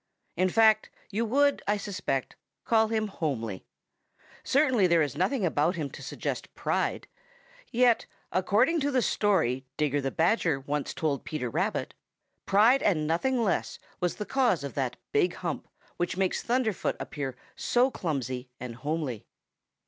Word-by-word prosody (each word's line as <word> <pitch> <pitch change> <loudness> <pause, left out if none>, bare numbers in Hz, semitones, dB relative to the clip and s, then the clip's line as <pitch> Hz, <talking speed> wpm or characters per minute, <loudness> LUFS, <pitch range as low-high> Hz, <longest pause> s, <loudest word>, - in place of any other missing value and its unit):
In 185 +1 +2
fact, 220 +1 +4 0.2
you 220 +3 0
would, 285 +5 +3
I 205 +1 +2
suspect, 200 -10 -3 0.3
call 220 -1 +4
him 220 -1 0
homely. 115 - -3 0.8
Certainly 255 -8 +3
there 170 -2 +4
is 145 -4 -3
nothing 200 +3 +1
about 165 +2 +1
him 150 -4 -3
to - - -10
suggest - - -5
pride. - - -1 0.6
Yet 245 -1 +3 0.2
according 220 - +3
to 285 0 0
the 260 -3 +2
story 160 - +1
Digger 145 -1 +1
the 135 - -1
Badger 165 - +2
once 145 +1 -3
told 150 -4 -1
Peter 125 -6 -3
Rabbit, - - -1 0.5
pride 225 +7 +5
and 160 -7 +2
nothing 235 +11 +1
less 200 - 0 0.2
was 180 -1 0
the 210 - -4
cause 245 - +2
of 140 - -5
that 130 -3 -1 0.2
big 175 +5 +2
hump 170 -5 -4 0.3
which 175 +1 -1
makes 190 -1 +1
Thunderfoot 235 -4 0
appear 135 -4 -4 0.2
so 265 -1 +2
clumsy 130 - -3
and 120 -2 -7
homely. 145 -5 -3
180 Hz, 150 wpm, -28 LUFS, 145-225 Hz, 0.8 s, pride